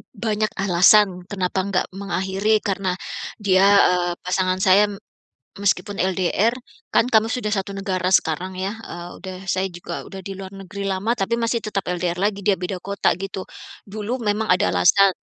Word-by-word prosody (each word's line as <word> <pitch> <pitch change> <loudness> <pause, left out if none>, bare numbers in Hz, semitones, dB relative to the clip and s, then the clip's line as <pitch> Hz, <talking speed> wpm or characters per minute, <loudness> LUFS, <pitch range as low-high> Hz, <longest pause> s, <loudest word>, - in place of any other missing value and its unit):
banyak 215 -1 -1
alasan 185 0 +4
kenapa 190 -2 -1
enggak 190 -1 0
mengakhiri 195 +2 0
karena 190 -2 -1 0.4
dia, 190 -3 +3 0.3
eee, 175 -1 +1
pasangan 185 0 +1
saya, 200 +2 +5 0.7
meskipun 200 0 0
LDR 190 +4 +1 0.4
kan 245 - +3
kamu 225 0 +3
sudah 230 -4 -2
1 200 -1 -2
negara 185 -2 -2
sekarang 180 +4 +1
ya. 195 +3 -2
Eee, 175 0 -7 0.2
udah 185 -1 -6
saya 190 +1 +1
juga 175 - -6
udah 195 - -9
di 195 +1 -7
luar 190 0 -8
negeri 195 +1 -7
lama 195 +5 0
tapi 195 +4 -1
masih 230 0 0
tetap 200 -2 -1
LDR 175 -1 -1
lagi 200 -1 0
dia 205 - +4
beda 180 +1 -3
kota 200 0 +1
gitu. 195 0 -5 0.5
Dulu 215 +5 -4
memang 210 0 0
ada 180 - +2
alasan 195 - +5
195 Hz, 160 wpm, -22 LUFS, 185-205 Hz, 0.7 s, saya